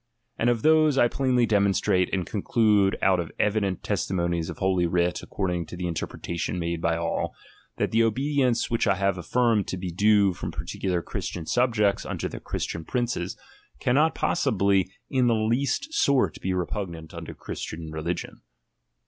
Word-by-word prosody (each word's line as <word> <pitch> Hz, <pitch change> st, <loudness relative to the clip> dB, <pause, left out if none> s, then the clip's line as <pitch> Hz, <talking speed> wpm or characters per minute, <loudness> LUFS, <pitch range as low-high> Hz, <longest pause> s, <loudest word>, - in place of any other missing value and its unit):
And 120 Hz, -, +1 dB
of 120 Hz, -2 st, 0 dB
those 155 Hz, -2 st, +5 dB
I 120 Hz, -, +5 dB
plainly 125 Hz, -1 st, +2 dB
demonstrate, 100 Hz, -3 st, +2 dB
and 95 Hz, -3 st, -1 dB
conclude 105 Hz, -2 st, +2 dB
out 95 Hz, -2 st, +4 dB
of 85 Hz, -2 st, -4 dB
evident 100 Hz, -3 st, 0 dB
testimonies 85 Hz, -3 st, -1 dB
of -, -, -6 dB
holy 95 Hz, -2 st, +1 dB
writ 85 Hz, 0 st, 0 dB
according 90 Hz, -4 st, -2 dB
to 90 Hz, -, -8 dB
the 90 Hz, -, -3 dB
interpretation 85 Hz, +1 st, -3 dB
made 85 Hz, -1 st, -2 dB
by 85 Hz, 0 st, +1 dB
all, 85 Hz, 0 st, -2 dB, 0.4 s
that -, -, 0 dB
the 115 Hz, -, +3 dB
obedience, 130 Hz, +1 st, +1 dB
which 115 Hz, -1 st, +1 dB
I 100 Hz, -, +4 dB
have 100 Hz, 0 st, +1 dB
aflSrmed 115 Hz, +3 st, +1 dB
to 95 Hz, -, -3 dB
be 90 Hz, -1 st, -4 dB
due 100 Hz, +1 st, +4 dB
from -, -, -5 dB
particular 90 Hz, -3 st, -3 dB
Christian 85 Hz, +2 st, -5 dB
subjects 105 Hz, -3 st, +2 dB
unto -, -, -3 dB
their -, -, -7 dB
Christian 85 Hz, -, -4 dB
princes, 120 Hz, -2 st, -2 dB, 0.4 s
cannot 150 Hz, +6 st, +2 dB
possibly 100 Hz, -, +1 dB, 0.2 s
in 130 Hz, -2 st, +3 dB
the 115 Hz, -, +3 dB
least 130 Hz, -, 0 dB
sort 140 Hz, -, +2 dB
he 95 Hz, -, -1 dB
repugnant 90 Hz, -3 st, -4 dB
unto -, -, -7 dB
Christian 80 Hz, -1 st, -6 dB
religion. 80 Hz, +2 st, -4 dB
100 Hz, 160 wpm, -26 LUFS, 90-120 Hz, 0.4 s, those